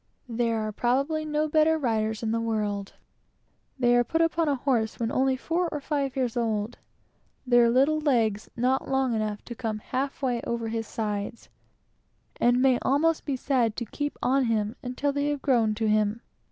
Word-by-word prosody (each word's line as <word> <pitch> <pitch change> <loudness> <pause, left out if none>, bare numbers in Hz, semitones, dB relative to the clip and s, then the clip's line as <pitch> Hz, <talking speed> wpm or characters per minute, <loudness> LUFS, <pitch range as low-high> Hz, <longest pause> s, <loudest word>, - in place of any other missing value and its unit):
There 230 -1 0
are 215 0 -2
probably 275 +8 0
no 305 0 0
better 310 +1 +3
riders 220 -5 -1
in 220 - 0
the 230 0 0
world. 210 -3 -2 0.8
They 245 -2 +3
get 245 +6 +2
upon 330 -1 +2
a 285 - +2
horse 240 -4 0
when 230 -1 -1
only 265 0 +2
four 335 +5 -1
or 300 - -3
five 280 -2 -2
years 255 -4 -1
old, 225 -1 -1 0.7
their 240 -2 +5
little 275 +6 +3
legs 230 -8 +1
not 255 +3 +1
long 265 -2 +1
enough 215 -2 -2
to 240 - -6
come 220 -2 -3
half 270 +6 -4
way 245 -3 0
over 235 -1 -3
his 225 -1 -3
sides; 210 +1 -4 0.9
and 245 +1 +3
may 260 -2 +4
almost 310 +4 +1
be 280 - -1
said 250 -4 0
to 235 - -3
keep 290 +6 -4
on 265 +1 +3
him 220 -1 0
until 270 +3 -2
they 285 +1 0
have 290 -2 -3
grown 230 -5 +2
to 220 0 -1
him. 215 +1 +1
245 Hz, 180 wpm, -26 LUFS, 225-275 Hz, 0.9 s, their